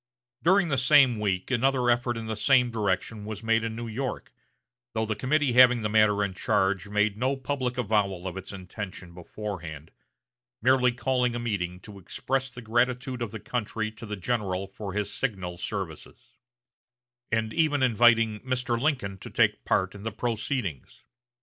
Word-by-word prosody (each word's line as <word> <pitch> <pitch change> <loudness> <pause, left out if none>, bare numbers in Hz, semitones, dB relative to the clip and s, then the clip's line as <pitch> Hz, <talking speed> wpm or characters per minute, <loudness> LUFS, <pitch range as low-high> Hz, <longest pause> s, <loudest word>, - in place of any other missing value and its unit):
During 185 0 +4
the 140 -3 +1
same 130 -3 +5
week 95 0 -1
another 130 0 +2
effort 120 0 0
in 115 - -5
the 110 0 -3
same 125 +2 +3
direction 105 0 -1
was 105 0 -6
made 115 0 +2
in 115 -1 -3
New 120 0 -5
York, 125 +4 -4 0.6
though 110 - 0
the 110 0 -2
committee 135 +3 +1
having 125 -2 +6
the 105 - 0
matter 105 -1 +4
in 100 -2 -2
charge 95 +1 0
made 105 0 +1
no 130 +2 +1
public 130 -2 -2
avowal 100 -6 0
of 90 - -5
its 95 -1 -7
intention 95 -2 -8
beforehand, 85 -4 -7 0.7
merely 125 +1 +4
calling 125 0 0
a - - -2
meeting 95 -6 -2
to 100 -1 -11
express 135 +9 -2
the 125 -1 -10
gratitude 125 +2 0
of 115 - -2
the 110 - -7
country 110 -1 -3
to 115 +1 -10
the 105 - -3
general 95 -2 -2
for 95 0 -7
his 105 0 -2
signal 95 -9 -3
services; 90 -3 -6 1.0
and 110 0 0
even 150 -4 +2
inviting 115 -2 +4
Mr. 125 -1 -1
Lincoln 125 -10 -1
to - - -9
take - - +2
part 95 0 +1
in 100 - -10
the 110 +2 -3
proceedings. 110 - -3
110 Hz, 170 wpm, -27 LUFS, 100-125 Hz, 1.0 s, having